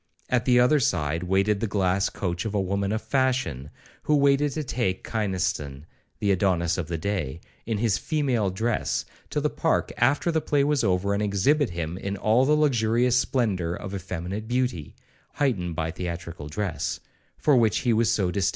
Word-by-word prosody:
At 125 -1 +1
the 125 -1 +5
other 125 +5 +4
side 80 - 0
waited 95 +3 +1
the 115 - -1
glass 95 -1 +1
coach 85 -3 -3
of 110 -2 -3
a - - +2
woman 100 +1 -1
of 110 +1 -2
fashion, 130 - 0 0.3
who 150 - +2
waited 140 0 +3
to 155 - -3
take 115 -8 -2
Kynaston 90 -10 -2 0.3
(the 100 - +1
Adonis 90 -2 +1
of 80 - -3
the 85 - -3
day), 85 -5 -3 0.3
in 115 -2 0
his 110 -2 +1
female 130 -10 0
dress, 110 +5 -1 0.2
to - - -1
the - - +1
park - - 0
after 145 +7 +2
the 160 -1 +1
play 145 -2 +1
was 145 -3 +1
over, 100 0 +1
and 100 - 0
exhibit 105 +8 +2
him 85 +1 -4
in 100 +1 -4
all 110 +6 +3
the 150 - +3
luxurious 120 -4 +2
splendour 105 -10 0
of 95 +1 -7
effeminate 95 +2 -5
beauty, 125 - -2 0.4
(heightened 95 - -1
by 80 0 -2
theatrical 85 -3 -6
dress), 80 -1 -3 0.4
for 150 - +3
which 110 -3 +3
he 120 -3 +2
was 115 +1 +2
so 95 -4 +1
distinguished. 100 0 +1
100 Hz, 180 wpm, -25 LUFS, 90-125 Hz, 0.4 s, the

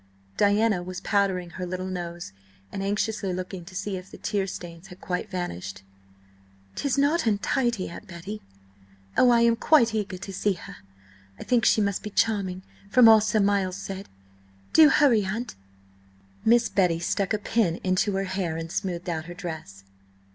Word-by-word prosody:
Diana 205 -1 +3
was 180 +1 -6
powdering 190 -4 0
her 180 +2 -5
little 185 +1 -4
nose, 175 - -6 0.4
and 195 - -4
anxiously 205 0 -1
looking 185 0 -5
to 185 +1 -12
see 195 +1 -3
if 185 +1 -10
the - - -11
tear 200 -3 -1
stains 175 -1 -8
had 180 -1 -13
quite 180 +3 -3
vanished. 100 - -5 0.9
"'Tis 280 -1 -1
not 285 0 +2
untidy, 225 0 0
Aunt 190 +5 -10
Betty. 190 +4 -7 0.7
Oh, 250 - +5
I 235 -1 +5
am 235 0 +4
quite 235 -2 +4
eager 205 -3 -2
to 195 +2 -8
see 205 +2 +1
her–I 95 - -14
think 245 -3 +2
she 215 - +4
must 200 -2 0
be 210 - -6
charming, 195 -4 0 0.3
from 245 +2 +7
all 220 -1 +8
Sir 215 +1 +1
Miles 195 -2 +1
said. 195 0 -7 0.6
Do 315 -2 +8
hurry, 265 -7 +4
aunt!" 220 +6 -4 0.9
Miss 235 +1 +4
Betty 180 -4 +2
stuck 185 +3 -1
a 215 - +2
pin 205 -4 +1
into 185 +2 +1
her 195 - 0
hair 185 -4 -2
and 165 0 -6
smoothed 180 -1 -3
out 160 -2 -3
her 175 +1 -9
dress. 160 - -7
195 Hz, 170 wpm, -26 LUFS, 175-215 Hz, 0.9 s, all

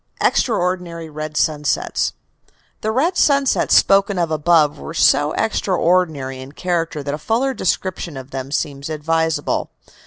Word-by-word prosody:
EXTRAORDINARY 180 -6 0
RED 155 0 -5
SUNSETS 150 -2 0 0.7
The 215 - -1
red 310 +10 +1
sunsets 280 -2 +3
spoken 195 0 +4
of 170 -2 0
above 155 -1 +3
were 160 - -8
so 145 -1 +4
extraordinary 170 -10 0
in 135 +2 -11
character 165 -4 -2
that 140 0 -3
a 150 - -4
fuller 240 - 0
description 185 - -2
of 130 +1 -9
them 135 0 -5
seems 140 -1 -3
advisable. 160 +1 -1
165 Hz, 130 wpm, -19 LUFS, 150-185 Hz, 0.7 s, spoken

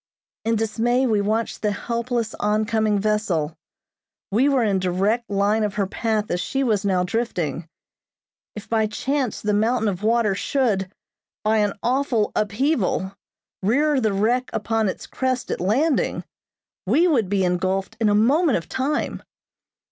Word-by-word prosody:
In 230 0 +2
dismay 230 +4 +1
we 215 -4 +2
watched 220 +3 -1
the 210 - +1
helpless, 235 +1 -2
on 210 +1 +1
coming 215 -1 +1
vessel. 195 -7 0 0.8
We 250 +8 +3
were 265 -4 +2
in 200 -3 +1
direct 195 +6 0
line 205 +2 +1
of 205 -2 -2
her 200 - +1
path 215 +1 -2
as 175 - 0
she 270 0 -1
was 215 -5 +1
now 185 -3 +1
drifting. 175 - -2 0.9
If 210 - -8
by 220 -1 +1
chance 260 +2 -2
the 210 0 0
mountain 220 +2 +1
of 190 -2 -2
water 220 -1 +2
should, 200 -4 0 0.5
by 215 +1 +2
an 205 -1 +1
awful 250 -4 +1
upheaval, 210 - 0 0.5
rear 275 +7 +2
the 220 -2 +1
wreck 230 +6 +1
upon 225 -2 0
its - - -6
crest 255 -1 -2
at - - -3
landing, 265 - +1 0.6
we 345 +3 +4
would 235 - +2
be 195 -1 +1
engulfed 185 +2 -1
in 220 -2 +3
a 205 - +3
moment 275 +7 +3
of 165 - -7
time. 285 +3 -2
215 Hz, 155 wpm, -23 LUFS, 200-245 Hz, 0.9 s, we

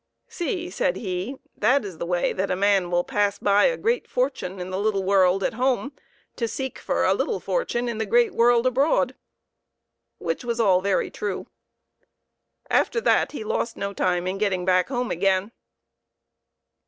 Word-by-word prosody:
" - - -55
See," 355 0 -4
said - - 0
he, 190 +5 -4
" - - -51
that 270 -2 +2
is 185 -5 -8
the 170 - -3
way 175 0 0
that 195 +1 -2
a - - +1
man 195 -2 +2
will 175 0 +1
pass 205 +1 0
by 200 0 +3
a - - +2
great 470 +2 -1
fortune 195 - -2
in 180 +1 -5
the 185 - -2
little 200 -2 0
world 190 0 +3
at - - 0
home 255 +3 0 0.5
to 230 - -1
seek 265 +3 -5
for - - 0
a - - +4
little - - -1
fortune 245 - -1
in 230 -2 -3
the 220 - -1
great 475 -3 +3
world 235 +1 +4
abroad" 265 0 +2 1.0
which 165 +5 -3
was 235 -1 -2
all 190 -5 +4
very 195 0 0
true. 205 -3 -4 1.2
After 465 - +2
that - - +2
he 255 - -5
lost 225 +2 -2
no 200 0 -3
time 180 -2 0
in 190 +1 -3
getting 190 -4 0
back 185 -1 +3
home 245 -2 -2
again. 190 +3 +1
205 Hz, 180 wpm, -24 LUFS, 185-255 Hz, 1.2 s, a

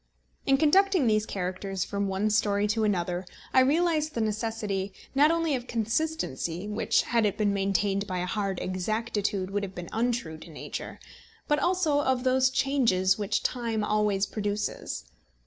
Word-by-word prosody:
In 270 - +5
conducting 370 +2 +4
these 215 -1 +2
characters 185 0 -3
from 200 0 -2
one 195 +3 0
story 205 -1 +2
to 220 +1 +1
another 180 -3 0 0.3
I - - +6
realised 310 +3 +2
the 230 - 0
necessity, 215 -3 -2 0.2
not 285 +2 +5
only 330 -2 +1
of 250 -2 -3
consistency, 225 - -2
which, 210 +1 +1
had 230 -1 +1
it 210 -1 0
been 210 -2 +2
maintained 195 0 0
by 185 -2 -3
a 180 - -1
hard 195 -1 -2
exactitude, 200 0 -2
would 205 0 0
have 195 -2 -6
been 175 -1 -6
untrue 225 -9 -1
to 170 - -12
nature, 155 - -7 0.5
but 295 0 +2
also 330 -3 +2
of 260 -3 +1
those 260 0 +3
changes 250 -9 +2
which 205 -2 0
time 230 -3 -1
always 210 -2 +1
produces. 205 - -3
210 Hz, 160 wpm, -28 LUFS, 195-260 Hz, 0.5 s, I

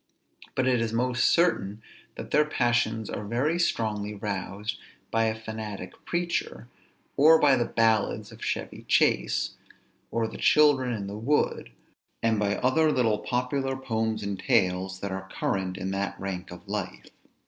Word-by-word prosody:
But 130 -1 +1
it 125 -2 +3
is 115 -1 -1
most 120 +1 +1
certain 110 - +2 0.3
that - - -8
their 150 - +5
passions 120 -6 0
are 105 - -4
very 130 +11 0
strongly 105 -9 -1
roused 100 +1 -4 0.3
by 115 0 +2
a 110 0 -1
fanatic 110 -4 -6
preacher, 170 - -2 0.5
or 160 +3 +7
by 140 -2 +5
the 120 -1 +1
ballads 115 -2 +1
of - - -11
Chevy - - -3
Chase, - - +2 0.5
or 115 -1 0
the - - -9
Children 145 -4 +4
in 105 -3 -4
the 100 +2 -6
Wood, 140 - 0 0.5
and 115 -2 +2
by 100 -1 +1
other 155 +5 +3
little 115 -6 +2
popular 130 +3 -1
poems 110 -4 -2
and 100 -1 -3
tales 95 +1 +1
that 100 - -3
are 95 0 -5
current 95 -1 -2
in 95 +1 -3
that 100 0 -3
rank 95 -1 -5
of 90 +3 -11
life. 100 -3 -5
110 Hz, 155 wpm, -27 LUFS, 100-125 Hz, 0.5 s, or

